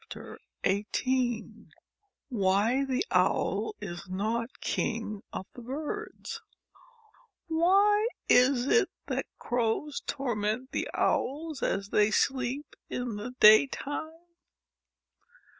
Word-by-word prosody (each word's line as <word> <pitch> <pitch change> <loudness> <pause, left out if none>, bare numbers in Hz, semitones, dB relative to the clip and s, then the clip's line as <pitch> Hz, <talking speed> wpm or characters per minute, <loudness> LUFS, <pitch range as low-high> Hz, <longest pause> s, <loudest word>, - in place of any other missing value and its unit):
39 190 - -4 0.2
XVIII 250 -3 -1 0.6
WHY 220 +4 +2
THE 265 +7 0
OWL 430 - +1
IS 175 +2 -7
NOT 225 +6 -2
KING 215 -2 -2
OF 190 - -5
THE 245 - -10
BIRDS 310 - -5 1.0
WHY 395 +6 +4 0.2
is 250 0 +5
it 420 +7 +3 0.2
that - - -2
Crows 245 +5 -1
torment 240 -1 -2
the - - -2
Owls 300 +1 0
as 200 +1 -1
they 210 0 +4
sleep 260 +4 0
in 245 -3 -3
the 245 +5 -6
daytime 275 +7 +5
250 Hz, 95 wpm, -29 LUFS, 215-290 Hz, 1.0 s, is